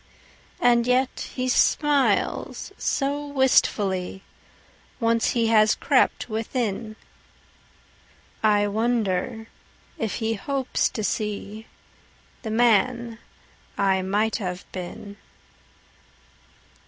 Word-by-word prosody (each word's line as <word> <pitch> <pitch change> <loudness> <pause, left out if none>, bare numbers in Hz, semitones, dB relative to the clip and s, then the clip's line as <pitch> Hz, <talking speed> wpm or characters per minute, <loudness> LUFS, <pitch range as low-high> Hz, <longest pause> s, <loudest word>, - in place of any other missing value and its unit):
And 240 -1 +3
yet 255 +1 0
he 255 0 -1
smiles 285 +2 +1
so 285 +1 -2
wistfullyOnce 230 -1 -1
he 235 -2 +1
has 215 -1 +5
crept - - +2
within,I 215 -1 -4
wonder 220 0 -1 0.5
if 220 -2 -2
he 225 -1 -1
hopes 265 +4 -1
to 220 - -5
seeThe 210 0 -3 0.9
man 235 +1 +2 0.6
I 190 -1 +2
might 205 +4 0
have 180 -4 -5
been. 195 +3 -8
225 Hz, 75 wpm, -24 LUFS, 205-245 Hz, 0.9 s, has